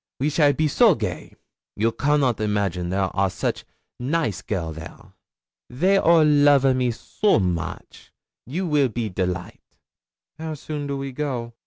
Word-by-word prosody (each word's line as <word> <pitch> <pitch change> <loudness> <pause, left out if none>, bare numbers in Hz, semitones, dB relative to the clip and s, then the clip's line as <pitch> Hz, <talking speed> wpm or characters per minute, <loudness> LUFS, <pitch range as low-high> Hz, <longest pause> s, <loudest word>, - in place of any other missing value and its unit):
We 145 +3 0
shall 145 -1 +4
be 155 +2 0
so 145 - +4
gay. - - -5 0.4
You 115 +2 +1
cannot 140 -4 +1
imagine 100 -4 -1
there 95 0 -1
are 95 0 +2
such - - -3 0.4
naice 130 - -1
girl 85 -6 -3
there. 80 +1 -11 0.6
They 185 +10 +2
all 165 -3 +5
love 145 -2 +5
a 135 - +4
me 130 -1 0
so 160 - 0
moche, 90 -4 -4 0.4
you 175 +9 -3
will 145 -5 +2
be 115 -1 -3
delight.' 90 -2 -5 0.6
'How 160 -1 -4
soon 145 0 -5
do 140 0 -3
we 135 0 -5
go?' 125 -4 -4
130 Hz, 155 wpm, -23 LUFS, 100-150 Hz, 0.6 s, all